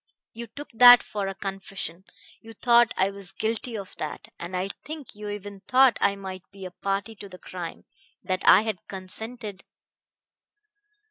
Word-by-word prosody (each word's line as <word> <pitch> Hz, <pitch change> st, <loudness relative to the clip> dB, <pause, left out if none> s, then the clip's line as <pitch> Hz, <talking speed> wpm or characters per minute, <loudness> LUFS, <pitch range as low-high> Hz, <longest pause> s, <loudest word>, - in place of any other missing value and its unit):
You 235 Hz, +1 st, -7 dB
took 285 Hz, +7 st, -10 dB
that 245 Hz, +1 st, +10 dB
for 205 Hz, -2 st, -4 dB
a 195 Hz, -, -4 dB
confession; 195 Hz, -2 st, -6 dB, 0.4 s
you 225 Hz, 0 st, -12 dB
thought 235 Hz, +1 st, +4 dB
I 190 Hz, +1 st, +2 dB
was 200 Hz, -2 st, -7 dB
guilty 225 Hz, +1 st, -2 dB
of 195 Hz, -2 st, -8 dB
that, 155 Hz, -, -6 dB
and 175 Hz, +2 st, -4 dB
I 185 Hz, +2 st, -2 dB
think 305 Hz, -2 st, -8 dB
you 210 Hz, 0 st, -7 dB
even 205 Hz, -1 st, -7 dB
thought 260 Hz, -1 st, +5 dB
I 200 Hz, 0 st, +3 dB
might 190 Hz, -2 st, -7 dB
be 195 Hz, -1 st, -10 dB
a 185 Hz, -, -7 dB
party 195 Hz, +4 st, -3 dB
to 200 Hz, -1 st, -10 dB
the 185 Hz, -, -11 dB
crime, 180 Hz, -2 st, -8 dB, 0.4 s
that 185 Hz, -1 st, -1 dB
I 200 Hz, -, +7 dB
had 215 Hz, -5 st, -2 dB
consented.... 205 Hz, +2 st, -6 dB
200 Hz, 170 wpm, -26 LUFS, 190-225 Hz, 0.4 s, that